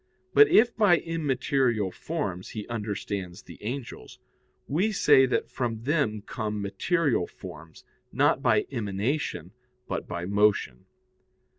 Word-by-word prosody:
But 430 - +8
if 235 - +4
by 205 -6 +5
immaterial 130 - 0
forms 95 - -4
he 105 - -5
understands 100 -3 -4
the - - -13
angels, 120 - -6 0.5
we 180 +10 +1
say 145 -9 +5
that 125 - -1
from 115 -3 -3
them 130 -8 0
come 105 -2 -4
material 115 - 0
forms, 80 +2 -12 0.3
not - - +2
by - - +3
emanation, 105 - -2 0.4
but - - -4
by 85 0 -4
motion. 100 -10 +1
115 Hz, 120 wpm, -27 LUFS, 100-145 Hz, 0.5 s, But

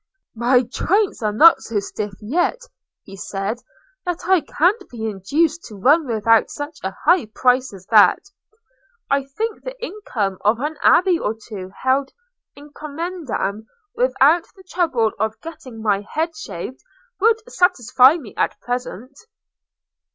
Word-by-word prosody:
"My 245 +2 +3
joints 380 - 0
are 215 -1 0
not 320 +11 +6
so 220 -2 -2
stiff 205 0 -5
yet," 335 - 0 0.5
he 195 - -12
said, 195 +4 -4 0.4
"that 355 -1 -4
I 375 -3 +4
can't 360 +10 0
be 225 -2 -6
induced 295 - -1
to 215 - -10
run 285 - +3
without 225 -1 +3
such 295 +1 -7
a 190 0 -4
high 340 -6 +4
prize 255 0 +2
as 190 -2 -13
that. 210 -2 +7 0.9
I 275 -1 +2
think 435 +11 -4
the - - -8
income 250 - -4
of 215 +3 +2
an 300 +3 -3
abbey 360 -1 +4
or 215 - -2
two 210 -4 -9
held 265 +1 +1 0.4
'in 290 +1 -14
commendam,' 295 - -4 0.3
without 345 - +3
the 380 - -16
trouble 320 -12 0
of 220 0 -2
getting 255 -9 -10
my 205 -2 +1
head 320 +9 -3
shaved, 225 - -7 0.4
would 445 +3 +4
satisfy 280 - +4
me 260 -12 -9
at - - -1
present." 245 +1 -5
265 Hz, 145 wpm, -20 LUFS, 220-335 Hz, 0.9 s, that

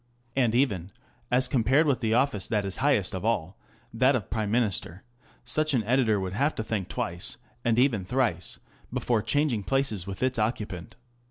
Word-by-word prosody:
And 120 -4 +2
even, 100 -9 +1 0.4
as 125 +1 +3
compared 130 +4 +3
with 140 -5 +2
the 110 -2 +1
office 125 -6 +1
that 105 -3 0
is 95 - 0
highest 130 -9 +2
of 95 - -4
all, 100 -5 0 0.4
that 130 +4 +4
of 115 - -1
the - - -27
Prime 110 -2 -1
Minister, 100 -5 0 0.4
such 155 +4 +1
an 115 - +1
editor 115 -2 +2
would 95 -1 -3
have 140 +8 +1
to 110 - -2
think 105 -5 -3
twice, 85 0 -3 0.3
and 115 -1 +2
even 125 -6 +3
thrice, 100 -6 -1 0.3
before 115 -3 0
changing 125 0 +1
places 110 -5 -1
with 100 +3 -4
its 130 -2 0
occupant. 105 -3 -3
115 Hz, 180 wpm, -27 LUFS, 100-130 Hz, 0.4 s, that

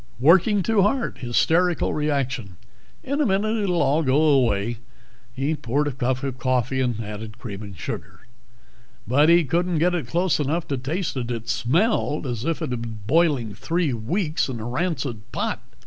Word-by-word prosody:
Working 190 - +5
too 220 0 +3
hard, 230 +6 0
hysterical 165 +8 +2
reaction. 135 - -2 0.5
In 280 +3 -1
a - - +3
minute 210 +3 +1
it'll 180 -6 +1
all 145 +4 +2
go 135 -1 +2
away." 120 -7 +2 0.5
He 135 +5 -1
poured 145 0 -1
a - - 0
cup 130 0 -1
of 130 -2 -4
coffee, 130 +1 0
added 110 -3 -4
cream 105 -4 -7
and 100 -3 -9
sugar. - - -6 0.9
But 145 +6 +4
he 170 0 +6
couldn't 170 +4 0
get 175 +3 +2
it 175 -3 -2
close 175 0 +1
enough 155 +4 -1
to 140 - -1
taste 160 +8 -3
it. 120 -2 -3
It 115 -2 -4
smelled 155 - +1
as 120 -2 -3
if 165 -1 -1
it - - -3
had 120 -2 -2
been 115 -2 -6
boiling 140 -6 +2
three 165 - -1
weeks 150 - -1
in 120 -3 -4
a 110 - -6
rancid 130 - -3
pot. - - -2
140 Hz, 175 wpm, -23 LUFS, 120-170 Hz, 0.9 s, he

